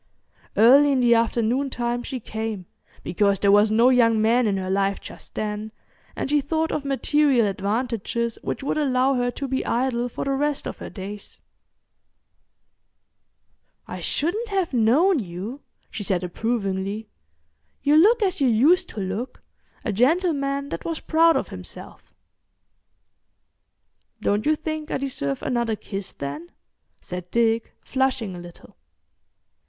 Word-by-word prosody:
Early 275 +7 +7
in 265 - +2
the 240 -1 +5
afternoon 235 +3 +1
time 240 -1 -2
she 255 +1 -5
came, 220 -4 -5 0.4
because 200 +2 +1
there 200 +1 +3
was 205 +1 +5
no 230 +4 +5
young 230 -3 +4
man 230 +2 +3
in 200 -2 0
her 190 0 -3
life 195 0 +1
just - - -12
then, 215 0 -3 0.4
and - - -3
she 295 +1 +2
thought 320 +3 -1
of 295 - -2
material 275 -2 +2
advantages 230 +3 -2
which - - -4
would 295 - -1
allow 265 -2 +2
her 245 -1 0
to 275 +3 -5
be 265 0 -1
idle 245 0 0
for - - -5
the 275 - 0
rest 290 +1 -1
of - - -7
her - - -7
days. 200 +1 -8 2.5
"I - - -6
shouldn't 425 +9 -1
have 385 -6 -1
known 275 - +4
you," 200 +7 -6 0.3
she - - -5
said 190 -3 -1
approvingly. 200 +1 -2 0.8
"You 290 +1 +4
look 430 +8 +5
as 370 -6 0
you 270 - +4
used 305 +11 +4
to - - -7
look—a 215 +3 -6
gentleman 280 - +1
that - - -5
was 330 -2 -3
proud 330 +1 +4
of - - -3
himself." - - -10 2.1
"Don't 205 +6 0
you 310 - +4
think 310 0 -5
I - - -1
deserve 140 - -3
another 235 -3 0
kiss, 195 -2 -6
then?" 145 +5 -6 0.5
said 180 0 -7
Dick, 230 0 +1
flushing 260 -7 -1
a - - -8
little. 175 -1 -13
240 Hz, 145 wpm, -24 LUFS, 210-280 Hz, 2.5 s, Early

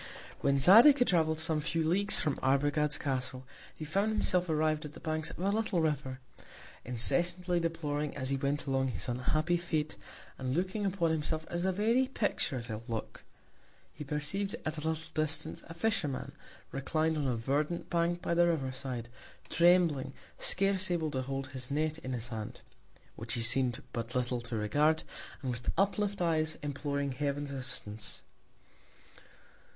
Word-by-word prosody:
When 140 0 +2
Zadig 225 - +8
had 245 - +2
travelled 160 -3 +2
some 160 -1 +3
few 165 +1 -1
Leagues 200 +5 +5
from 150 -3 -1
Arbogad's 145 +2 +2
Castle, 130 -1 -3 0.3
he 155 - -6
found 195 +8 0
himself 180 -4 +2
arriv'd 155 0 +1
at 150 -1 -8
the - - -11
Banks 155 0 -2
of - - -9
a 190 +3 0
little 215 -4 0
River; 145 -5 -1 0.6
incessantly 175 +9 +3
deploring, 150 -3 -2
as 130 -1 -2
he - - +2
went 140 +2 -1
along, 135 -1 0
his 125 0 -2
unhappy 155 +8 0
Fate, 160 -3 -2 0.4
and 130 0 -2
looking 190 +3 -1
upon 175 -4 0
himself 160 0 -2
as 175 - -1
the 190 +1 +1
very 230 +7 +2
Picture 220 - -1
of 120 -2 -5
ill 110 0 -4
Luck. 115 -2 -5 0.7
He 150 - -7
perceiv'd 150 +8 -1
at 155 0 -3
a 160 +1 -1
little 160 0 -3
Distance 155 -1 -1
a 165 - -9
Fisherman, 165 -8 -1 0.4
reclin'd 155 +4 0
on 145 -3 -1
a 125 - 0
verdant 145 +8 -2
Bank 170 +1 0
by - - 0
the 175 0 +4
River 145 -6 0
side, 130 -2 -5 0.4
trembling, 170 -6 +3 0.3
scarce 195 0 +4
able 165 -3 -1
to 130 -2 -2
hold 135 0 -4
his 130 -2 -4
Net 155 +2 -1
in 130 -3 -5
his 120 -1 -1
Hand, 110 -2 -6 0.5
(which 115 +1 -4
he 115 - -1
seem'd 120 +1 +2
but 115 +2 -4
little 125 -1 -1
to 120 0 -5
regard) 145 +9 +2 0.4
and 130 - -1
with 120 0 -4
uplift 200 -1 +1
Eyes, 155 -2 +1
imploring 140 -1 -2
Heaven's 140 +1 -2
Assistance. 120 -6 -3
150 Hz, 165 wpm, -31 LUFS, 130-170 Hz, 0.7 s, Zadig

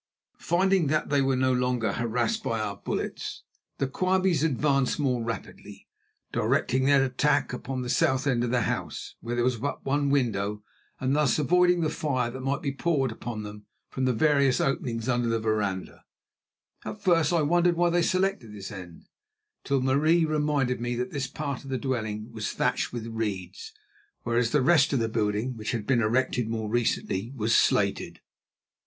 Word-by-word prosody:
Finding 185 -1 +2
that 155 +2 0
they 140 -1 +3
were 135 -1 +2
no 130 0 +2
longer 125 -2 0
harassed 120 - -1
by 115 - -2
our 105 -2 -3
bullets, - - -4 0.3
the - - 0
Quabies 185 +2 +1
advanced 140 -3 +1
more 125 -5 0
rapidly, 115 0 -7 0.4
directing 130 +1 +1
their 140 -1 +5
attack 140 +2 +1
upon 130 0 -4
the - - -5
south 130 +2 +2
end 125 -4 +1
of 120 - -1
the 125 -1 +1
house, - - -4
where 120 +1 -3
there 120 - +1
was 125 -1 +1
but 140 +6 -4
one 140 +1 +1
window, 105 -6 0 0.4
and 130 +2 0
thus 150 -5 +2
avoiding 180 +4 +3
the 155 - +1
fire 130 -7 -1
that 130 +2 -7
might 135 +1 -2
be 140 - 0
poured 135 -3 0
upon 110 -1 -6
them 105 0 -10 0.2
from 130 - -1
the 130 - +3
various 140 0 +3
openings 120 -4 -1
under 120 -2 +1
the 115 0 +1
veranda. 105 -4 -2 0.8
At 210 - -6
first 165 -4 +3
I 170 -3 +2
wondered 175 +3 +3
why 175 0 +2
they 175 +1 +2
selected 185 - 0
this 95 -2 -7
end, 90 -4 -10 0.6
till 140 -1 +1
Marie 155 +6 +3
reminded 150 -5 0
me 120 0 -2
that 125 +1 -3
this 135 -3 -2
part 140 -3 -5
of 135 - -10
the 130 - -1
dwelling 110 -4 -3
was 110 -2 -4
thatched - - 0
with 120 -2 -5
reeds, 115 - -4 0.5
whereas 120 0 +1
the 145 +1 +2
rest 145 -1 +4
of 135 - +2
the 115 -1 0
building, 110 +4 -1
which 110 0 -4
had 115 -3 -3
been 125 -1 +2
erected 120 +1 +1
more 110 -2 -3
recently, 115 -2 -1
was 115 -1 +1
slated. - - +1
130 Hz, 180 wpm, -27 LUFS, 115-145 Hz, 0.8 s, their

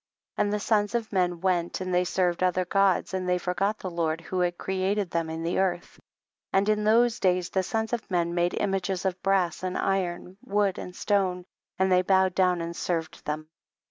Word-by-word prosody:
4. - - +2
And 205 - -1
the 210 - 0
sons 210 +1 +1
of 225 -3 -2
men 180 -3 +1
went 180 -2 0
and 185 -1 -3
they 180 0 +3
served 180 -1 0
other 185 0 +2
Gods, 195 0 +2
and 185 -1 -2
they 180 - +3
forgot 195 +4 -1
the 185 - -5
Lord 165 -1 -1
who 180 +2 -4
had 175 -1 0
created 190 0 -1
them 165 -1 -1
in 160 0 -4
the 170 +2 0
earth: 180 -2 -1 0.5
and 195 +1 +2
in 210 0 +2
those 235 +2 +4
days 180 -1 +1
the 190 - +1
sons 220 +4 -2
of 235 - -3
men 170 -2 0
made 175 0 +1
images 195 -1 -1
of 185 -1 -1
brass 190 -4 +1
and 185 0 -2
iron, 185 -1 -2
wood 200 -2 0
and 180 - -8
stone, 185 -3 0 0.3
and 190 0 +2
they 180 0 +5
bowed 190 0 +3
down 180 -2 +2
and 170 0 -5
served 165 -2 -3
them. 155 +1 -4
185 Hz, 205 wpm, -27 LUFS, 175-195 Hz, 0.5 s, they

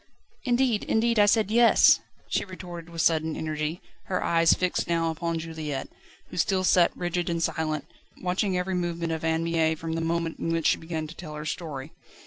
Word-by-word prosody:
"Indeed, 245 -3 +2
indeed, 230 0 +2
I 205 - +6
said 215 0 +3
Yes," 235 0 +6 0.3
she - - 0
retorted 175 -3 -9
with 165 -1 -2
sudden 160 -1 +2
energy, 155 +2 -3 0.2
her 185 - -1
eyes 165 -1 +4
fixed 180 -1 -1
now 165 -1 +1
upon 165 +1 -2
Juliette, 160 -4 -5 0.4
who - - -9
still 185 +2 +1
sat 180 -2 +4
rigid 175 -1 -1
and 170 -1 -1
silent, 155 -2 -1 0.3
watching 185 +1 0
every 185 +1 -1
movement 170 -2 -2
of 160 -1 -3
Anne 160 0 +1
Mie 165 -1 +1
from 160 +1 -5
the 165 - -1
moment 165 0 -1
in 165 - -2
which 165 -1 -1
she - - +4
began 160 -1 -4
to 155 - -9
tell 155 -3 -8
her 150 0 -6
story. 150 -2 -5
165 Hz, 190 wpm, -26 LUFS, 160-180 Hz, 0.4 s, I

